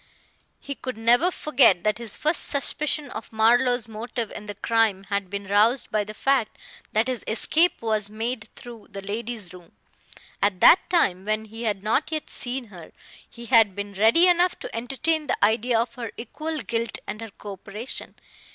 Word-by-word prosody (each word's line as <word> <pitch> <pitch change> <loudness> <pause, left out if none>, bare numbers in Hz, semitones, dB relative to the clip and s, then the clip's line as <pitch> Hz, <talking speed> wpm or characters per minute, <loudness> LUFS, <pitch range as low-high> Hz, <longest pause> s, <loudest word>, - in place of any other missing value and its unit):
He 280 - -6
could 255 -4 -7
never 240 +9 +4
forget 255 - +3
that 215 +1 0
his 230 -4 -5
first 310 +3 +1
suspicion 295 +1 -1
of 220 - -8
Marlowe's 240 +2 +3
motive 225 +1 -5
in 210 - -8
the 205 - -6
crime 220 -3 +1
had 200 -2 -1
been 200 +1 -5
roused 215 +6 +2
by 215 -1 +1
the 215 +1 -8
fact 265 -2 +1 0.3
that 220 +2 +2
his 255 -3 -3
escape 310 +8 +2
was 215 -2 +1
made 225 +2 -4
through 235 -3 -11
the 200 -1 -8
lady's 215 -2 -5
room. 180 -2 -15 0.7
At 200 -2 +1
that 350 - +6
time, 195 - +2
when 215 +1 -1
he 225 +2 -8
had 205 -3 -2
not 225 +9 0
yet 310 -1 -4
seen 245 -2 -1
her, 170 -3 -12 0.4
he 235 0 -11
had 225 -5 +4
been 205 0 -5
ready 225 - +5
enough 355 0 +3
to - - -7
entertain 280 +6 -1
the 245 - +2
idea 230 +2 +1
of 235 - -2
her 235 -3 -6
equal 310 +7 -5
guilt 230 0 -2
and 215 - -6
her 225 - -7
coöperation. 205 +4 -8
225 Hz, 180 wpm, -24 LUFS, 210-255 Hz, 0.7 s, that